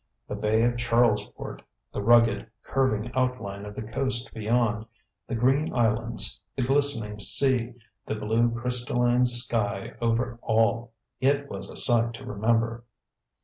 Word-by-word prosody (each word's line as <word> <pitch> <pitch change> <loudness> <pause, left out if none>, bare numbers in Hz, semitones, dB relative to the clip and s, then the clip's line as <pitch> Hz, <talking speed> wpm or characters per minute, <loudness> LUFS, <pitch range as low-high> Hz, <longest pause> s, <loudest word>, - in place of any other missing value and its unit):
The - - -5
Bay 110 +1 +1
of 120 0 +1
Charlesport, 120 0 0 0.3
the - - -3
rugged, 115 -1 +4
curving 120 -4 0
outline 115 -6 -2
of 105 - -9
the - - -5
coast 125 +3 -2
beyond, 115 0 0 0.4
the 120 - -3
green 135 +6 +2
islands, 115 -1 0
the 130 - -1
glistening 130 -6 +1
sea, 120 +4 +2 0.3
the - - -2
blue 110 +3 +1
crystalline 120 +1 +1
sky 115 -5 0
over 120 +1 0
all 115 +1 +1 0.3
it 140 +1 +1
was - - -6
a - - -10
sight 115 -2 +2
to - - -10
remember. 115 +2 0
115 Hz, 135 wpm, -26 LUFS, 110-125 Hz, 0.4 s, rugged